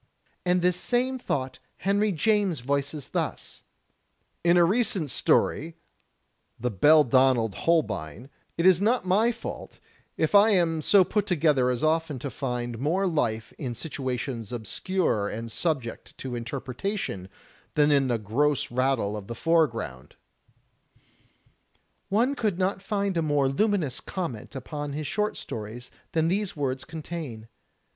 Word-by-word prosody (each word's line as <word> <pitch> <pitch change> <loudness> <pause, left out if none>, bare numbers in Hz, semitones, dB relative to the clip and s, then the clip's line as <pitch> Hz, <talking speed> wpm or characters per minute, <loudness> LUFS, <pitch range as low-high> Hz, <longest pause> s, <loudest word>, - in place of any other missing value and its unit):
And 180 0 +3
this 180 0 +3
same 255 +5 0
thought 130 - -3 0.2
Henry 205 +2 +1
James 195 - +1
voices 140 +2 -2
thus: - - -4 0.8
"In 175 +1 +5
a 175 - +6
recent 195 - +1
story, 160 +2 +1 0.8
'The 125 +1 -1
Beldonald 130 - +4
Holbein,' 130 - -1 0.3
it 165 - +1
is 185 -1 +6
not 230 +1 +2
my 210 +6 +3
fault 230 - -8 0.4
if 160 - 0
I 205 +2 +7
am 170 -6 +2
so 195 +5 +6
put 210 +2 -1
together 150 -7 +3
as 125 +1 -1
often 160 -2 +1
to 135 +2 -5
find 120 -4 -3
more 170 +9 +1
life 120 - -1
in 125 -5 -4
situations 125 -5 -4
obscure 120 - -1
and 115 +1 -5
subject 135 -5 -3
to 130 -2 -6
interpretation 125 - -4 0.5
than 150 0 +4
in 140 -2 +3
the 120 -2 +1
gross 125 +8 0
rattle 125 -5 +1
of 100 -2 -7
the 115 - -5
foregroimd." 115 - 0 2.0
One 235 +7 +2
could 215 -9 -1
not 190 +1 0
find 200 -2 -1
a - - +2
more 145 -3 +2
luminous 165 - 0
comment 145 - -5
upon 145 +2 -5
his 150 +1 -4
short 210 +8 -1
stories 115 +3 -7 0.2
than 160 0 +2
these 200 +2 -1
words 135 -3 -2
contain. 155 -8 -7
150 Hz, 135 wpm, -26 LUFS, 125-185 Hz, 2.0 s, I